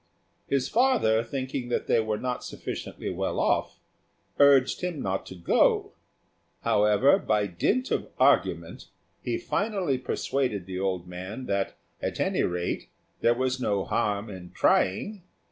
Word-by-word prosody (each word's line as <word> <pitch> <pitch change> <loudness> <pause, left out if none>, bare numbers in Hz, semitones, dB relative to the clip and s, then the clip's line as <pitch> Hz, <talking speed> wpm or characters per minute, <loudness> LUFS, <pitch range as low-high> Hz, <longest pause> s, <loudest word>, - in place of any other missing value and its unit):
His 135 -2 +1
father, 225 - +3
thinking 130 0 -4
that 120 - -1
they 115 - +3
were 110 -1 -1
not 125 +1 -3
sufficiently - - -5
well - - -2
off, - - 0 0.6
urged 140 -2 +5
him 180 -4 -3
not 95 -4 -2
to 95 - -8
go; 85 -1 +2 0.7
however, 105 - +4
by 105 - +1
dint 205 - 0
of - - -1
argument, - - +2 0.3
he 345 - -1
finally 200 - -1
persuaded 125 -5 -1
the 95 0 -5
old 95 -2 -2
man 95 +8 -7
that, 100 -2 -1 0.2
at - - -3
any - - +1
rate, 90 0 -2 0.3
there 120 0 +3
was 130 +1 -1
no 100 -4 0
harm 105 +1 0
in 95 -4 -9
trying. 195 - +1
115 Hz, 140 wpm, -27 LUFS, 95-140 Hz, 0.7 s, urged